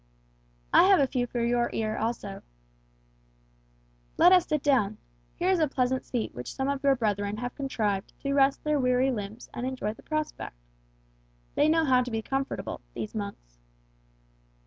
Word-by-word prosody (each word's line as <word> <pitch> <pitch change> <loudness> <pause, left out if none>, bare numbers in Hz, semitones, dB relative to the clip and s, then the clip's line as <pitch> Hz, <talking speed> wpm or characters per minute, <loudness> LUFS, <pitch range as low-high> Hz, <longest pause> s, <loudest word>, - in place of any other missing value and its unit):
"I - - +8
have 385 -1 +6
a 280 - +5
few 250 -2 -1
for 240 0 -2
your 240 0 +1
ear 215 -1 -1
also." 220 -3 -3 1.8
"Let 355 - +7
us 365 -2 +5
sit 300 -3 0
down. 240 -8 +2 0.4
Here 365 +2 +1
is 370 - +2
a 310 - +3
pleasant 260 -1 0
seat 240 -3 -3
which 125 0 -7
some 265 - -1
of 280 -1 -1
your 275 -1 +5
brethren 205 -3 -1 0.2
contrived 215 -8 -2
to 275 0 -1
rest 275 0 +3
their 300 -1 +1
weary 250 +1 +2
limbs 215 0 -6
and 240 - -5
enjoy 250 -5 -3
the - - -17
prospect. 310 - -4 1.0
They 300 - +3
know 325 0 +3
how 255 -3 +4
to 250 - -3
be 225 -1 -2
comfortable, 270 +4 -3
these 215 - -5
monks." 200 - -7
250 Hz, 165 wpm, -28 LUFS, 215-280 Hz, 1.8 s, I